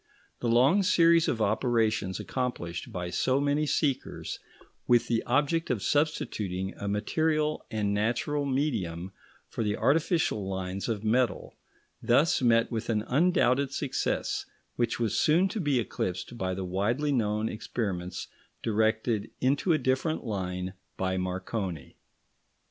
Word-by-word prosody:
The 120 - -2
long 130 - +5
series 170 -3 +4
of 110 -2 0
operations 110 -3 +1
accomplished 90 -10 -4
by 90 -1 -4
so 130 +7 +1
many 145 +2 +1
seekers, 140 -3 -1 0.5
with 120 -1 +4
the 115 -1 +1
object 145 +6 +1
of 115 -6 -1
substituting 100 - -1
a 100 - -5
material 155 +9 0
and 105 -2 -1
natural 120 +8 0
medium 100 - -1 0.4
for - - -3
the 105 -1 -1
artificial 150 - +1
lines 95 +2 -3
of 110 -2 -2
metal, 120 +2 0 0.5
thus 140 +7 +3
met 115 -1 +3
with 115 0 -3
an 105 -2 +1
undoubted 140 -3 +2
success 140 -1 -2 0.3
which 120 -1 0
was 115 -3 +1
soon 170 +5 +4
to 215 - -3
be 145 -7 +1
eclipsed 95 -1 -3
by 95 -4 -2
the 95 0 -4
widely 110 +11 0
known 110 -4 +1
experiments 95 -5 -4 0.4
directed 110 0 +1
into 140 +7 +2
a 160 - +4
different 130 +4 0
line 95 -4 -3 0.2
by 95 0 0
Marconi. 95 - -4
115 Hz, 130 wpm, -28 LUFS, 100-140 Hz, 0.5 s, long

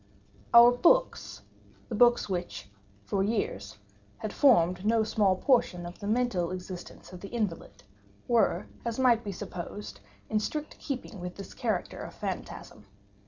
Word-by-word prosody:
Our 235 +1 +9
books—the 350 - -1
books 240 +2 +4
which, 175 - -4 0.4
for 195 - -1
years, 195 - -2 0.4
had 215 - -5
formed 185 - +4
no 220 +1 +3
small 205 -3 +2
portion 185 -6 +1
of 175 +1 -9
the 205 - -6
mental 215 -6 0
existence 185 0 -8
of 180 - -8
the 200 - -7
invalid—were, 165 - -2 0.2
as 235 -1 -3
might 245 -3 +3
be 205 - -4
supposed, 180 +2 -7 0.3
in 215 - +1
strict 300 +8 -5
keeping 250 -7 -6
with 180 0 -6
this 195 - -9
character 220 -8 -2
of - - -8
phantasm. 105 -2 -7
205 Hz, 135 wpm, -29 LUFS, 180-240 Hz, 0.4 s, Our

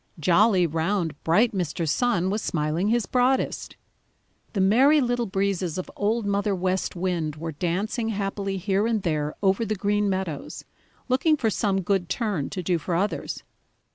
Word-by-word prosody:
Jolly, 185 +4 +4
round, 165 +1 -1
bright 210 +9 +3
Mr. 170 -3 -2
Sun 190 - +1
was 210 +2 -1
smiling 155 +3 -1
his 230 -1 +2
broadest. 255 +4 0 0.8
The 205 - -1
Merry 255 +11 +5
Little 245 -2 0
Breezes 195 -3 -1
of 185 - -5
Old 220 +2 0
Mother 200 0 0
West 185 +1 -1
Wind 170 -4 -2
were 165 +1 -5
dancing 195 - -2
happily 195 -1 -2
here 195 +3 0
and 220 -4 0
there 150 -3 -1
over 195 +3 +3
the 215 -1 -1
Green 205 +1 +1
Meadows, 185 -6 -4 0.4
looking 270 +5 +3
for 225 -5 0
some 195 -2 0
good 185 -1 0
turn 195 - -1
to 185 -3 -5
do 175 -1 +1
for 170 +2 -2
others. 195 +5 -2
195 Hz, 160 wpm, -25 LUFS, 175-215 Hz, 0.8 s, Merry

